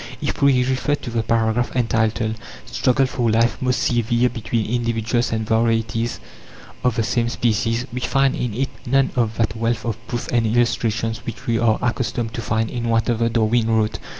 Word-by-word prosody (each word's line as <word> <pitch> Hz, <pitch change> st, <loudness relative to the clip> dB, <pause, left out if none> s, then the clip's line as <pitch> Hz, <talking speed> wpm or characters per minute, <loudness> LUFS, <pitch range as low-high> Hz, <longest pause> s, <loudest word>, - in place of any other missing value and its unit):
If -, -, -3 dB
we 135 Hz, -3 st, +4 dB
refer 130 Hz, +3 st, 0 dB
to 120 Hz, -, -7 dB
the 115 Hz, -1 st, 0 dB
paragraph 115 Hz, +2 st, 0 dB
entitled 115 Hz, -2 st, +1 dB, 0.3 s
"Struggle 125 Hz, +3 st, +2 dB
for 125 Hz, -2 st, -1 dB
Life 115 Hz, +2 st, +2 dB
most 125 Hz, -1 st, +1 dB
severe 120 Hz, +1 st, +2 dB
between 115 Hz, -2 st, -2 dB
Individuals 115 Hz, 0 st, 0 dB
and 110 Hz, -1 st, -1 dB
Varieties 115 Hz, 0 st, 0 dB, 0.6 s
of 125 Hz, -2 st, +2 dB
the 115 Hz, -, +1 dB
same 120 Hz, +1 st, 0 dB
Species," 115 Hz, +1 st, 0 dB
we 125 Hz, -, -2 dB
find 135 Hz, +1 st, +2 dB
in 120 Hz, -4 st, -3 dB
it 135 Hz, +2 st, -1 dB, 0.2 s
none 135 Hz, +2 st, +3 dB
of 115 Hz, -3 st, 0 dB
that 110 Hz, -2 st, 0 dB
wealth 115 Hz, 0 st, -1 dB
of 115 Hz, -2 st, -2 dB
proofs 120 Hz, -1 st, -4 dB
and 115 Hz, -2 st, +2 dB
illustrations 115 Hz, -1 st, 0 dB
which 115 Hz, 0 st, -8 dB
we 115 Hz, -1 st, +1 dB
are 115 Hz, -2 st, +3 dB
accustomed 120 Hz, -1 st, -1 dB
to 115 Hz, -, -4 dB
find 110 Hz, 0 st, -1 dB
in 120 Hz, -1 st, -3 dB
whatever 115 Hz, 0 st, +1 dB
Darwin 115 Hz, 0 st, +2 dB
wrote. 110 Hz, -1 st, +1 dB
115 Hz, 180 wpm, -21 LUFS, 115-120 Hz, 0.6 s, we